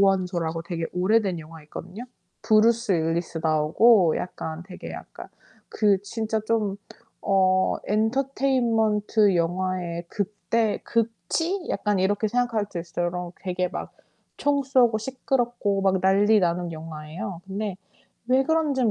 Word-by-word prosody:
원소라고 180 Hz, -4 st, +1 dB
되게 165 Hz, -1 st, -3 dB
오래된 190 Hz, 0 st, +2 dB
영화 160 Hz, 0 st, -11 dB
있거든요. 180 Hz, +9 st, -8 dB, 0.4 s
브루스 225 Hz, 0 st, +3 dB
윌리스 165 Hz, 0 st, -1 dB
나오고 160 Hz, +4 st, +4 dB
약간 160 Hz, -2 st, -5 dB
되게 185 Hz, -1 st, -9 dB
약간 -, -, -10 dB, 0.4 s
그 205 Hz, -3 st, +2 dB
진짜 220 Hz, +1 st, -2 dB
좀 215 Hz, -4 st, 0 dB, 0.5 s
어 185 Hz, -1 st, +3 dB
엔터테인먼트 225 Hz, -3 st, +2 dB
영화의 175 Hz, 0 st, -1 dB
극대, 210 Hz, +2 st, -1 dB
극치? 230 Hz, -, -1 dB
약간 205 Hz, -1 st, 0 dB
이렇게 205 Hz, +3 st, +1 dB
생각할 230 Hz, -2 st, 0 dB
수 175 Hz, -, -5 dB
있어요. 175 Hz, +1 st, -3 dB
요런 180 Hz, 0 st, -4 dB
되게 180 Hz, -1 st, -1 dB
막 185 Hz, -, -6 dB, 0.5 s
총 285 Hz, -1 st, +1 dB
쏘고 250 Hz, -4 st, +3 dB
시끄럽고 240 Hz, -4 st, -1 dB
막 190 Hz, -1 st, +2 dB
난리 205 Hz, +3 st, +4 dB
나는 175 Hz, -1 st, 0 dB
영화예요. 160 Hz, +3 st, -7 dB
근데 195 Hz, 0 st, -4 dB, 0.5 s
왜 260 Hz, +2 st, +4 dB
그런진 285 Hz, -6 st, +1 dB
200 Hz, 275 characters per minute, -25 LUFS, 175-230 Hz, 0.5 s, 나오고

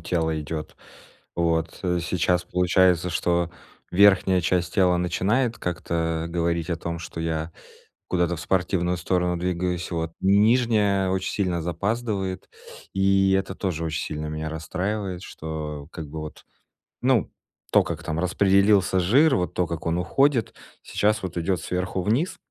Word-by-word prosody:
тело 80 Hz, -2 st, -1 dB
идет. 75 Hz, +1 st, -6 dB, 0.6 s
Вот. 85 Hz, -1 st, 0 dB
Э. 90 Hz, -1 st, +1 dB
Сейчас 90 Hz, +1 st, 0 dB
получается, 90 Hz, 0 st, +2 dB
что 85 Hz, 0 st, 0 dB, 0.4 s
верхняя 95 Hz, -1 st, +5 dB
часть 85 Hz, 0 st, 0 dB
тела 90 Hz, -3 st, +4 dB
начинает 105 Hz, +8 st, 0 dB
как-то 85 Hz, -1 st, -2 dB
говорить 85 Hz, 0 st, -1 dB
о 85 Hz, -, 0 dB
том, 85 Hz, 0 st, -4 dB
что 80 Hz, 0 st, -7 dB
я 80 Hz, 0 st, -2 dB, 0.6 s
куда-то 90 Hz, -1 st, +1 dB
в -, -, -7 dB
спортивную 90 Hz, 0 st, 0 dB
сторону 90 Hz, 0 st, 0 dB
двигаюсь. 90 Hz, 0 st, -2 dB
Вот, 80 Hz, -1 st, -3 dB
нижняя 105 Hz, -1 st, +3 dB
очень 95 Hz, 0 st, -1 dB
сильно 90 Hz, -4 st, -1 dB
запаздывает, 100 Hz, +2 st, -2 dB, 0.5 s
и 95 Hz, 0 st, +3 dB
это 95 Hz, 0 st, 0 dB
тоже 85 Hz, -5 st, -3 dB
очень 80 Hz, -1 st, -2 dB
сильно 75 Hz, 0 st, -4 dB
меня 80 Hz, 0 st, -4 dB
расстраивает, 95 Hz, +3 st, -3 dB
что 75 Hz, -3 st, -6 dB
как 80 Hz, -3 st, -7 dB
бы 80 Hz, +1 st, -6 dB
вот 75 Hz, 0 st, -9 dB, 0.6 s
Ну, 125 Hz, -8 st, +2 dB, 0.4 s
то -, -, +5 dB
как -, -, -5 dB
там 80 Hz, +1 st, -3 dB
распределился 95 Hz, +1 st, +3 dB
жир, 135 Hz, -, +4 dB
вот 90 Hz, -1 st, -1 dB
то, 90 Hz, -2 st, 0 dB
как 85 Hz, -1 st, -5 dB
он 85 Hz, +1 st, 0 dB
уходит, 130 Hz, +6 st, +1 dB, 0.3 s
сейчас 105 Hz, +1 st, +1 dB
вот 90 Hz, -2 st, -5 dB
идёт 85 Hz, 0 st, 0 dB
сверху 90 Hz, +1 st, -2 dB
вниз. 120 Hz, -, 0 dB
90 Hz, 145 wpm, -24 LUFS, 85-95 Hz, 0.6 s, верхняя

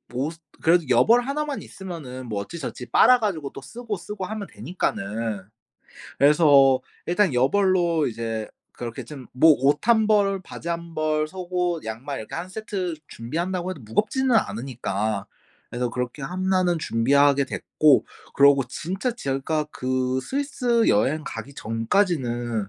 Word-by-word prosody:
옷 145 Hz, +6 st, -2 dB, 0.3 s
그래도 170 Hz, +1 st, +4 dB
여벌 175 Hz, -, +5 dB
1 280 Hz, +4 st, -2 dB
만 285 Hz, -2 st, -4 dB
있으면은 150 Hz, -10 st, -8 dB
뭐 105 Hz, -3 st, -3 dB
어찌저찌 130 Hz, +1 st, -6 dB
빨아 250 Hz, 0 st, +6 dB
가지고 165 Hz, -11 st, -2 dB
또 135 Hz, -, -9 dB
쓰고, 230 Hz, -, -6 dB
쓰고 195 Hz, +2 st, -6 dB
하면 210 Hz, 0 st, -5 dB
되니까는 110 Hz, -, -3 dB, 0.8 s
그래서 140 Hz, -3 st, +6 dB, 0.3 s
일단 180 Hz, 0 st, +2 dB
여벌로 170 Hz, +4 st, +2 dB
이제 115 Hz, -1 st, -4 dB, 0.2 s
그렇게 120 Hz, -1 st, -6 dB
좀 135 Hz, -5 st, -10 dB
뭐 155 Hz, +5 st, +6 dB
옷 145 Hz, +7 st, +2 dB
1 220 Hz, -2 st, +4 dB
벌, 200 Hz, -2 st, +3 dB
바지 170 Hz, -, -8 dB
1 170 Hz, 0 st, -4 dB
벌, 155 Hz, -1 st, 0 dB
속옷, 180 Hz, -3 st, -2 dB
양말 120 Hz, +6 st, -5 dB
이렇게 110 Hz, -, -8 dB
1 175 Hz, +2 st, -4 dB
세트 190 Hz, -4 st, -4 dB
준비한다고 175 Hz, +9 st, -3 dB
해도 170 Hz, -, -7 dB
무겁지는 220 Hz, -, 0 dB
않으니까 110 Hz, -, -1 dB, 0.4 s
그래서 120 Hz, 0 st, -2 dB
그렇게 125 Hz, +3 st, -4 dB
1 185 Hz, +4 st, 0 dB
는 175 Hz, -2 st, +1 dB
준비하게 140 Hz, +2 st, +3 dB
됐고 145 Hz, +1 st, +2 dB, 0.3 s
그러고 140 Hz, -1 st, +5 dB
진짜 190 Hz, -, -3 dB
제가 150 Hz, -, -2 dB
그 130 Hz, 0 st, -1 dB
스위스 250 Hz, -, 0 dB
여행 140 Hz, +9 st, +2 dB
가기 140 Hz, -, -7 dB
전까지는 120 Hz, -, -1 dB
155 Hz, 285 characters per minute, -24 LUFS, 125-185 Hz, 0.8 s, 빨아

